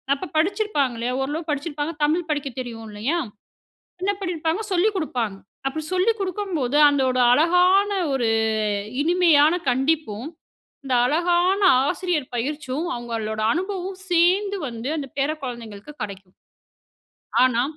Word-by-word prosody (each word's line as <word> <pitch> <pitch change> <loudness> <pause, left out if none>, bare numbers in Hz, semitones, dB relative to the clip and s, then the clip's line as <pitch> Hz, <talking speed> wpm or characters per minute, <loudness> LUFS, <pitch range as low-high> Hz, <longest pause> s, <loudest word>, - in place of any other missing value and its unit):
அப்ப 345 +6 -7
படிச்சிருப்பாங்க 330 - +1
இல்லையா? 245 +2 -1
ஓரளவு 305 +4 -3
படிச்சிருப்பாங்க 295 +1 -3
தமிழ் 320 +3 +1
படிக்கத் 285 -4 -3
தெரியும் 230 -3 -6
இல்லையா? 225 +11 -1 0.8
என்ன 390 +2 +1
பண்ணியிருப்பாங்க? 340 0 -1
சொல்லி 370 +4 +3
குடுப்பாங்க. 245 - -2 0.3
அப்படி 315 +3 -3
சொல்லி 370 +5 +3
குடுக்கும் 390 -1 -3
போது 260 -1 -1
அதோட 265 -3 +2
அழகான 360 +7 +4 0.2
ஒரு 250 -4 +1 0.7
இனிமையான 325 -2 +4 0.2
கண்டிப்பும், 265 -3 0 0.6
இந்த 265 -2 0
அழகான 350 +6 +2 0.3
ஆசிரியர் 315 -6 -2
பயிற்சியும், 290 +4 -3
அவங்களோட 225 -3 -4
அனுபவம் 375 +2 -3
சேர்ந்து 370 +4 +3
வந்து 230 +1 -6
அந்த 285 -3 -4
பேர 275 +1 +2
குழந்தைங்களுக்கு 235 -1 -7
கெடைக்கும். 195 -2 -8 1.1
ஆனா, 240 -2 +2
300 Hz, 120 wpm, -23 LUFS, 250-355 Hz, 1.1 s, அழகான